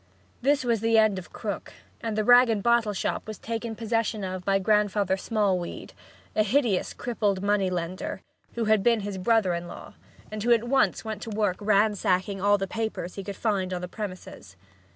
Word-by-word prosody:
This 280 +2 +2
was 230 -3 +1
the 225 0 +3
end 215 -3 +4
of 175 - -13
Krook, 205 -4 -5 0.3
and 225 -2 -3
the 215 - +2
rag 245 +2 +7
and 210 -3 0
bottle 235 -2 +3
shop 200 - -3
was 215 -2 -6
taken 230 0 -4
possession 225 -2 -1
of 185 -1 -4
by 195 +1 +2
Grandfather 205 -1 +2
Smallweed, 195 -3 -2 0.4
a - - +4
hideous, 215 -3 +1
crippled 205 -5 -1
money 200 -2 +2
lender, 180 +1 -4 0.3
who 235 -1 -1
had 215 -1 +3
been 230 0 +3
his 200 -1 -5
brother 205 -2 +2
in 170 0 -4
law, - - -10 0.4
and 215 0 -5
who 240 +3 +1
at 230 -1 +2
once 245 -1 +1
went 220 -1 -5
to - - -6
work 210 -3 0
ransacking 200 -2 +1
all 205 +1 +4
the 195 - -2
papers 220 -3 -4
he 195 - -6
could 200 0 -6
find 195 -4 -1
on 180 - -4
the 180 - -4
premises. 185 - -8
210 Hz, 195 wpm, -26 LUFS, 190-225 Hz, 0.4 s, rag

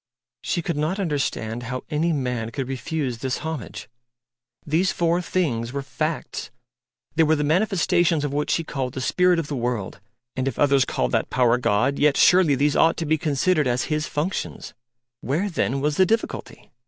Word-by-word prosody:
She 170 - -2
could 170 -2 -2
not 160 +7 -1
understand 135 - -2
how 125 +2 -5
any 160 +3 +1
man 125 -6 -2
could 130 +2 -4
refuse 135 -1 -3
this 130 0 -2
homage. 160 -9 -5 0.8
These 165 +5 +2
four 170 +1 +1
things 130 -11 -1
were 140 +1 -4
facts 155 +3 -4 0.6
they 165 - +2
were 160 0 +4
the 150 - -1
manifestations 170 -2 +2
of 145 - -3
what 150 +1 -1
she 165 - +1
called 130 -5 -4
the - - -3
Spirit 180 +6 +3
of 165 - -1
the 145 - -3
World 120 -5 -3 0.4
and 130 0 -1
if 135 - -2
others 140 -2 +4
called - - -1
that - - 0
Power 125 -1 +3
God, 125 +4 +1
yet 145 -1 +3
surely 180 -6 +5
these 145 +2 +1
ought 165 0 +4
to 165 - -2
be 155 +1 +1
considered 155 0 +1
as 125 +4 -1
His 150 0 -1
functions. 160 +6 -3 0.5
Where 165 - -1
then 140 -5 -1
was 150 +1 0
the 190 - +6
difficulty? 225 +3 -3
150 Hz, 180 wpm, -23 LUFS, 130-165 Hz, 0.8 s, the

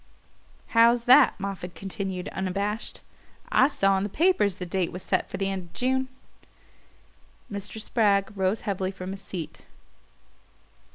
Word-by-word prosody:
"How's 230 +1 +5
that?" 255 -1 +6
Moffatt 195 -2 -5
continued 195 -1 -4
unabashed. 200 +3 -3 0.5
"I 260 - +5
saw 195 -10 +2
in - - -2
the 205 - -2
papers 305 - +2
the 185 - -6
date 180 0 -1
was 180 - -7
set - - 0
for - - -5
the 195 - -1
end 190 -2 -3
of 170 - -20
June." 260 +1 0 1.4
Mr. 200 +2 -5
Spragg 210 -2 +1
rose 190 +2 0
heavily 190 -2 -2
from 190 -1 -6
his 195 0 -7
seat. 180 -5 -7
195 Hz, 145 wpm, -26 LUFS, 190-225 Hz, 1.4 s, that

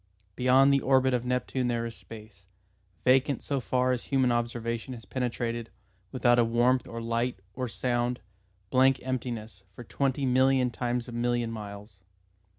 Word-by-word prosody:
Beyond 130 +2 +5
the 140 - +4
orbit 130 -1 +3
of 125 0 -1
Neptune 125 0 -1
there 120 -1 -1
is 115 -1 -6
space, 105 -4 -13 0.6
vacant 135 +2 +3
so 140 -1 -1
far 125 +3 +1
as 125 -2 -2
human 130 -3 +2
observation 120 +1 -2
has 115 - -12
penetrated, 120 -2 -3 0.4
without 120 -2 +3
warmth 120 +3 +2
or 115 - -6
light 115 +1 -1 0.2
or 125 +4 -3
sound, 120 +1 -1 0.5
blank 130 0 +4
emptiness, 120 -6 -4
for 120 - -9
twenty 135 +2 -1
million 130 0 +3
times 120 +1 -2
a - - -7
million 120 0 -1
miles. 100 -2 -9
120 Hz, 150 wpm, -28 LUFS, 115-130 Hz, 0.6 s, Beyond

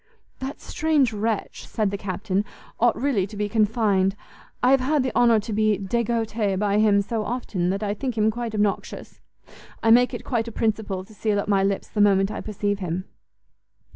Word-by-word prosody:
"That 265 +2 -5
strange 300 -7 +1
wretch," 215 0 -3
said 210 -3 -1
the - - -2
Captain, 195 0 -2 0.4
"ought 235 -1 +3
really 235 -8 +1
to 210 +1 -10
be 210 0 -1
confined; 205 -3 +2 0.5
I 250 - +5
have 270 - +5
had 275 +2 +1
the 260 - -3
honour 235 -2 +5
to 215 +1 -5
be 215 -1 +2
degoute 220 -1 -1
by 205 +1 +1
him 205 -2 +4
so 220 +1 -2
often, 210 -7 -2
that 195 +3 -2
I 205 -1 0
think 245 +2 -4
him 215 0 +3
quite 230 -1 -4
obnoxious. 205 -1 -2 0.6
I 225 - +4
make 245 +2 +6
it - - -8
quite 235 -3 -1
a - - -5
principle 210 -4 -2
to 215 - -17
seal 210 -1 0
up 200 - -3
my 195 -2 +3
lips 195 0 -1
the 210 - -1
moment 195 -1 +4
I - - -5
perceive 205 -1 -2
him." 180 0 -3
215 Hz, 195 wpm, -24 LUFS, 200-235 Hz, 0.6 s, make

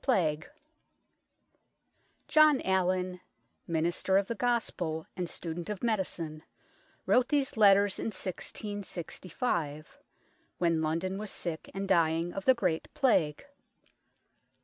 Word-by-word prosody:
XVI 160 - +1 1.8
JOHN 310 -3 +6
ALLIN, 185 -1 0 0.5
minister 170 +3 +1
of 200 0 +1
the - - -1
Gospel 200 -9 -1
and 180 -2 -3
student 170 +1 -5
of 210 -1 -5
medicine, 175 -8 -2 0.6
wrote 250 0 +3
these 285 -2 +1
letters 200 -2 +5
in - - -2
1665, 185 - -4 0.6
when 170 -2 +2
London 170 +5 -1
was 215 0 -5
sick 165 -4 -5
and 195 0 -3
dying 165 -1 +2
of 195 - -5
the 260 - +6
Great 180 -8 -1
Plague. 165 - +2
185 Hz, 105 wpm, -30 LUFS, 165-210 Hz, 1.8 s, JOHN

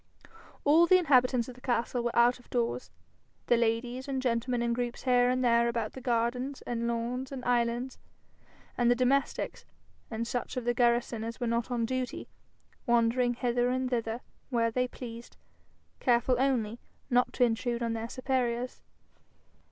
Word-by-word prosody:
All 320 +4 +5
the 370 - +7
inhabitants 255 -8 +3
of 255 - -8
the 250 - -17
castle 240 -1 0
were 240 0 -2
out 240 +1 +4
of 245 - -21
doors, 240 0 -1 0.6
the 240 - +4
ladies 240 +3 -1
and 270 -1 -1
gentlemen 245 -1 0
in 235 0 +1
groups 240 0 -3
here 245 -1 +4
and 255 0 +1
there 235 0 +4
about 230 -2 -2
the 260 - -9
gardens 245 +3 -1
and 235 -1 -2
lawns 240 +3 -2
and 265 -2 -6
islands, 240 +1 0 0.8
and 240 -1 +2
the 245 - +5
domestics, 260 +3 0 0.5
and 230 0 -3
such 245 +2 -3
of 250 - -3
the 240 - +2
garrison 240 -1 +1
as 230 +1 -6
were 245 - -1
not 235 +1 -1
on 240 -2 0
duty, 255 +1 -3 0.6
wandering 240 +1 +2
hither 245 0 +1
and 255 0 -1
thither 230 0 -2 0.3
where 230 -3 +1
they 250 +2 0
pleased, 235 -2 -9 0.6
careful 245 +1 +3
only 240 -4 0 0.3
not 245 0 +3
to 250 - +2
intrude 235 0 0
on 230 -1 -1
their 225 0 -4
superiors. 250 -2 -2
245 Hz, 165 wpm, -30 LUFS, 235-255 Hz, 0.8 s, the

